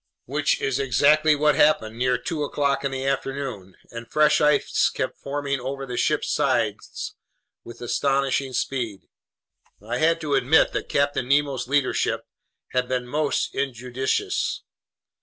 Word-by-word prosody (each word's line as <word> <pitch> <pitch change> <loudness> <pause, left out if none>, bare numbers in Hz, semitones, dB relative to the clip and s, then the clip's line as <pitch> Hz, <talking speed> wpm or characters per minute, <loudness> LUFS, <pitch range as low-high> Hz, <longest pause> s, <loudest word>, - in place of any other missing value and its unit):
Which - - 0
is 135 0 -1
exactly 145 +4 +4
what 150 +1 +3
happened 115 -9 +3
near 125 +1 +1
two 155 +5 -4
o'clock 140 -1 0
in 140 - 0
the 135 0 -4
afternoon, 135 -8 -3 0.2
and 115 0 -8
fresh 150 0 +4
ice 150 0 +3
kept - - -4
forming 140 -1 -2
over 135 +2 -5
the 125 -2 -6
ship's - - 0
sides - - -1 0.5
with 120 0 -12
astonishing 135 +1 0
speed. 120 -6 -2 0.8
I 115 +4 -4
had 165 +1 +3
to 150 -3 -2
admit 135 +3 +4
that - - -3
Captain 140 -3 0
Nemo's 140 -3 +1
leadership 140 -1 0 0.4
had 125 -1 0
been 125 -1 -1
most 145 +3 -1
injudicious. 130 - -2
135 Hz, 140 wpm, -24 LUFS, 125-145 Hz, 0.8 s, exactly